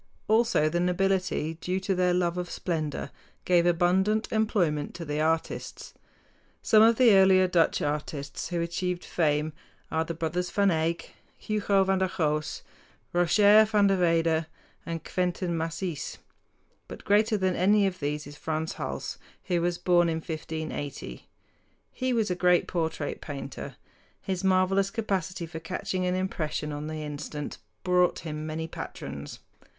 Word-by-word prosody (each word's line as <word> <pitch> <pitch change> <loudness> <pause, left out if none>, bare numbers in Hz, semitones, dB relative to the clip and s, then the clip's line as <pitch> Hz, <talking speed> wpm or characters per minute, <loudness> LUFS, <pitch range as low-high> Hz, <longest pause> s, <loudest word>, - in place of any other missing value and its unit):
Also 225 -7 +3
the 170 +3 0
nobility, 180 -2 0
due 185 +1 -1
to 190 +1 -1
their 180 -1 +2
love 175 -1 +1
of 180 0 -4
splendor, 155 -5 -3 0.3
gave 175 -1 +4
abundant 190 +5 +2
employment 180 -10 0
to 170 -1 -6
the 150 0 -2
artists. 160 +1 -2 0.7
Some 215 - +6
of 225 +1 +6
the 245 -1 +6
earlier 190 -1 +6
Dutch 175 -2 +2
artists 145 -1 -3
who 175 -2 -2
achieved 175 +1 -2
fame 150 -2 0 0.4
are 160 0 +1
the 165 0 -5
brothers 165 +3 -2
Van 200 -1 +2
Eyck, 165 +1 -1 0.2
Hugo 205 -2 +1
van 190 0 +1
der 190 - +2
Goes, 155 -2 -1 0.5
Roger 205 +5 +6
van 210 -1 +3
der 195 -1 +3
Weyden, 165 -2 +2 0.4
and 165 -1 -4
Quentin 180 -1 -1
Massys. 165 0 -3 0.7
But - - -10
greater 215 +2 +3
than 185 -2 +1
any 200 +3 +4
of 185 -1 -2
these 145 0 -2
is 145 +1 -10
Frans 160 +1 -3
Hals, - - -4 0.2
who 175 -2 0
was 175 0 0
born 175 -1 +3
in 165 - 0
1580. 155 - -6 0.6
He 255 0 -2
was 225 -5 +1
a - - +1
great 180 0 +3
portrait 160 -4 -2
painter. 140 -2 -7 0.4
His 190 -1 -3
marvelous 190 +1 +3
capacity 190 -5 -2
for 160 0 -7
catching 185 +2 -3
an 180 - +1
impression 155 -5 -2
on 145 +1 -5
the 155 0 -5
instant 150 0 -6 0.2
brought 180 -1 +3
him 155 -1 -5
many 160 +1 -3
patrons. 70 - -7
175 Hz, 150 wpm, -27 LUFS, 160-190 Hz, 0.7 s, Some